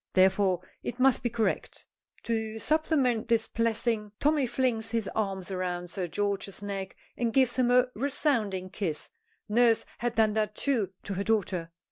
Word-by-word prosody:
Therefore 190 Hz, -1 st, +4 dB, 0.2 s
it 245 Hz, -, -5 dB
must 265 Hz, 0 st, +4 dB
be 240 Hz, -, 0 dB
correct. 225 Hz, -1 st, -2 dB, 0.4 s
To 220 Hz, -1 st, -2 dB
supplement 270 Hz, -2 st, +1 dB
this 225 Hz, -1 st, +2 dB
blessing 225 Hz, -2 st, -1 dB
Tommy 295 Hz, -2 st, +2 dB
flings 240 Hz, -2 st, 0 dB
his 225 Hz, -3 st, -1 dB
arms 195 Hz, -3 st, -2 dB
around 180 Hz, -1 st, -3 dB
Sir 185 Hz, -3 st, -3 dB
George's 200 Hz, +1 st, -2 dB
neck 195 Hz, -1 st, -4 dB, 0.2 s
and 235 Hz, -1 st, 0 dB
gives 260 Hz, -1 st, +3 dB
him 250 Hz, -1 st, +3 dB
a 250 Hz, 0 st, +5 dB
resounding 225 Hz, -8 st, 0 dB
kiss. 175 Hz, -7 st, -3 dB, 0.4 s
Nurse 230 Hz, +1 st, +4 dB
had 240 Hz, 0 st, -1 dB
done 220 Hz, -1 st, +3 dB
that, 215 Hz, -1 st, 0 dB
too, 240 Hz, -9 st, +1 dB
to 200 Hz, -, -4 dB
her 195 Hz, +1 st, -2 dB
daughter. 190 Hz, -6 st, 0 dB
220 Hz, 155 wpm, -29 LUFS, 195-240 Hz, 0.4 s, a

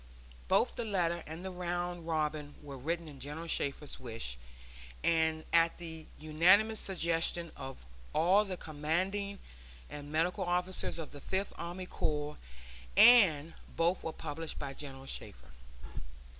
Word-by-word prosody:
Both -, -, +2 dB
the -, -, -1 dB
letter 175 Hz, -5 st, 0 dB
and 160 Hz, +4 st, -7 dB
the 190 Hz, -, -3 dB
round 175 Hz, -1 st, -3 dB
robin 150 Hz, -2 st, -1 dB
were 140 Hz, -2 st, -7 dB
written 165 Hz, +5 st, -3 dB
at 145 Hz, -3 st, -10 dB
General 150 Hz, +5 st, -6 dB
Shafter's 145 Hz, -2 st, -2 dB
wish, 115 Hz, -, -5 dB, 0.7 s
and 160 Hz, -1 st, +2 dB
at 165 Hz, 0 st, +4 dB
the 160 Hz, -2 st, -8 dB
unanimous 185 Hz, +8 st, +4 dB
suggestion 170 Hz, -2 st, +1 dB
of 135 Hz, -, -8 dB, 0.3 s
all 185 Hz, +6 st, +4 dB
the 190 Hz, -3 st, -4 dB
commanding 185 Hz, +7 st, -1 dB, 0.5 s
and 145 Hz, 0 st, -7 dB
medical 165 Hz, +3 st, +1 dB
officers 180 Hz, +1 st, 0 dB
of 160 Hz, -3 st, -6 dB
the 145 Hz, -, -10 dB
Fifth 190 Hz, +5 st, -2 dB
Army 175 Hz, +2 st, -5 dB
Corps, 150 Hz, -3 st, -2 dB, 0.6 s
and 165 Hz, -11 st, +7 dB, 0.2 s
both 170 Hz, +2 st, +2 dB
were 160 Hz, -, -2 dB
published 160 Hz, +1 st, -5 dB
by 140 Hz, -1 st, -4 dB
General 135 Hz, -2 st, -7 dB
Shafter. -, -, -7 dB
165 Hz, 135 wpm, -33 LUFS, 150-180 Hz, 0.7 s, and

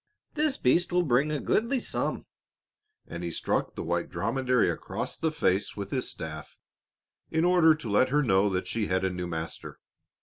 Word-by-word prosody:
"This 300 Hz, -2 st, +1 dB
beast 170 Hz, +9 st, +2 dB
will 180 Hz, 0 st, +3 dB
bring 140 Hz, 0 st, +2 dB
a 150 Hz, -, -1 dB
goodly 235 Hz, -, +1 dB
sum," -, -, -2 dB, 0.8 s
and 85 Hz, +1 st, -7 dB
he 85 Hz, -, -2 dB
struck 85 Hz, -, -2 dB
the -, -, -4 dB
white 85 Hz, +1 st, -1 dB
dromedary 120 Hz, +7 st, +1 dB
across -, -, -3 dB
the 160 Hz, -, 0 dB
face 95 Hz, -9 st, 0 dB
with 100 Hz, -1 st, -5 dB
his 130 Hz, -, -1 dB
staff 80 Hz, -1 st, -7 dB, 0.7 s
in 160 Hz, +1 st, +1 dB
order 175 Hz, -3 st, +5 dB
to 155 Hz, -, -8 dB
let 110 Hz, +5 st, +3 dB
her 150 Hz, +2 st, +2 dB
know 95 Hz, -3 st, +3 dB
that 95 Hz, -1 st, -2 dB
she 110 Hz, -2 st, -1 dB
had 95 Hz, +1 st, 0 dB
a 95 Hz, -, 0 dB
new 90 Hz, 0 st, -4 dB
master. 80 Hz, -1 st, -6 dB
120 Hz, 180 wpm, -28 LUFS, -, 0.8 s, order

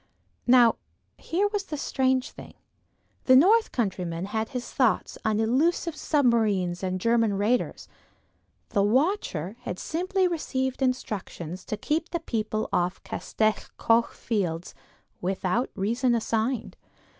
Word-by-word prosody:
Now 245 Hz, -2 st, +6 dB, 0.4 s
here 385 Hz, +5 st, 0 dB
was 395 Hz, -4 st, -3 dB
a 300 Hz, -, -2 dB
strange 260 Hz, -2 st, 0 dB
thing. -, -, -12 dB, 0.7 s
The 260 Hz, -, +7 dB
north 425 Hz, -, +5 dB
countryman 180 Hz, -6 st, -2 dB
had 220 Hz, +2 st, -2 dB
his 250 Hz, -3 st, -5 dB
thoughts 250 Hz, -5 st, +1 dB
on 215 Hz, -1 st, +1 dB
elusive 300 Hz, +8 st, +1 dB
submarines 220 Hz, -, +1 dB
and 185 Hz, -1 st, -2 dB
German 230 Hz, 0 st, +2 dB
raiders; 215 Hz, +5 st, 0 dB, 0.8 s
the 200 Hz, -, +1 dB
watcher 225 Hz, -, 0 dB
had 245 Hz, -7 st, -5 dB
simply 370 Hz, -, 0 dB
received 265 Hz, -6 st, -2 dB
instructions 195 Hz, -8 st, -3 dB
to 215 Hz, -, -3 dB
keep 310 Hz, +9 st, -1 dB, 0.2 s
people 215 Hz, -1 st, -2 dB
off 180 Hz, +1 st, +1 dB
the -, -, -21 dB
Castell 215 Hz, -1 st, 0 dB, 0.2 s
Coch 230 Hz, +1 st, +2 dB
fields, 180 Hz, -7 st, -2 dB, 0.5 s
without 190 Hz, +5 st, -1 dB
reason 235 Hz, +5 st, +1 dB
assigned. 230 Hz, +2 st, -1 dB
230 Hz, 120 wpm, -26 LUFS, 200-265 Hz, 0.8 s, The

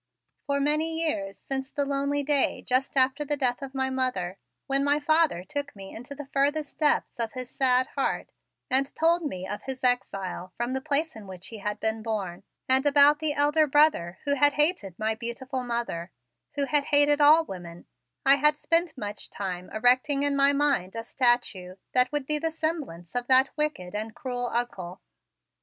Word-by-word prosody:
For 280 Hz, 0 st, 0 dB
many 310 Hz, +3 st, +1 dB
years, 195 Hz, -9 st, -3 dB
since 265 Hz, 0 st, -4 dB
the 285 Hz, -, -1 dB
lonely 280 Hz, +1 st, -1 dB
day 285 Hz, -1 st, +1 dB
just 260 Hz, +2 st, 0 dB
after 265 Hz, +3 st, +3 dB
the 295 Hz, 0 st, -2 dB
death 250 Hz, -2 st, 0 dB
of 270 Hz, 0 st, -8 dB
my 265 Hz, 0 st, -1 dB
mother, 200 Hz, -9 st, -2 dB, 0.3 s
when 275 Hz, 0 st, +1 dB
my 290 Hz, +1 st, +2 dB
father 310 Hz, -, +2 dB
took 285 Hz, +4 st, -5 dB
me 195 Hz, -1 st, -10 dB
into 245 Hz, +5 st, -8 dB
the 290 Hz, 0 st, -8 dB
furthest 290 Hz, +2 st, -1 dB
depths 300 Hz, -5 st, +1 dB
of 230 Hz, -1 st, -2 dB
his 255 Hz, -1 st, -7 dB
sad 255 Hz, -1 st, +2 dB
heart 275 Hz, -, -3 dB, 0.4 s
and 270 Hz, +2 st, +2 dB
told 335 Hz, +2 st, +3 dB
me 185 Hz, -, -5 dB
of 205 Hz, -, -5 dB
his 265 Hz, -1 st, -7 dB
exile 195 Hz, -7 st, 0 dB
from 240 Hz, +2 st, -2 dB
the 265 Hz, -, -2 dB
place 310 Hz, +3 st, +1 dB
in 215 Hz, -3 st, -11 dB
which 185 Hz, -1 st, -8 dB
he 225 Hz, -, -9 dB
had 210 Hz, +1 st, -4 dB
been 220 Hz, 0 st, -1 dB
born, 205 Hz, -6 st, -4 dB, 0.3 s
and 260 Hz, +1 st, +4 dB
about 290 Hz, +1 st, +6 dB
the 310 Hz, -2 st, +1 dB
elder 295 Hz, +2 st, +3 dB
brother 275 Hz, -, +2 dB
who 285 Hz, -, +2 dB
had 290 Hz, +1 st, +4 dB
hated 295 Hz, -, +1 dB
my 220 Hz, +1 st, 0 dB
beautiful 250 Hz, +3 st, -5 dB
mother, 235 Hz, -8 st, -3 dB, 0.5 s
who 285 Hz, -1 st, +1 dB
hated 290 Hz, 0 st, +4 dB
all 310 Hz, +3 st, +6 dB
women, 175 Hz, -, -9 dB, 0.4 s
I 275 Hz, +1 st, +6 dB
had 300 Hz, +1 st, +3 dB
spent 335 Hz, -2 st, +1 dB
much 210 Hz, -3 st, -4 dB
time 185 Hz, -2 st, -5 dB
erecting 255 Hz, +5 st, +2 dB
in 285 Hz, -1 st, +1 dB
my 280 Hz, 0 st, +4 dB
mind 280 Hz, -10 st, 0 dB
a 230 Hz, -, -4 dB
statue 235 Hz, -7 st, 0 dB, 0.2 s
that 250 Hz, 0 st, +3 dB
would 295 Hz, -2 st, -2 dB
be 300 Hz, +2 st, 0 dB
the 325 Hz, +1 st, -1 dB
semblance 310 Hz, -, -4 dB
of 245 Hz, 0 st, -2 dB
that 260 Hz, +1 st, +4 dB
wicked 300 Hz, -13 st, -3 dB
and 215 Hz, +1 st, -5 dB
cruel 250 Hz, -4 st, -4 dB
Uncle. 190 Hz, -7 st, -3 dB
265 Hz, 185 wpm, -26 LUFS, 220-290 Hz, 0.5 s, about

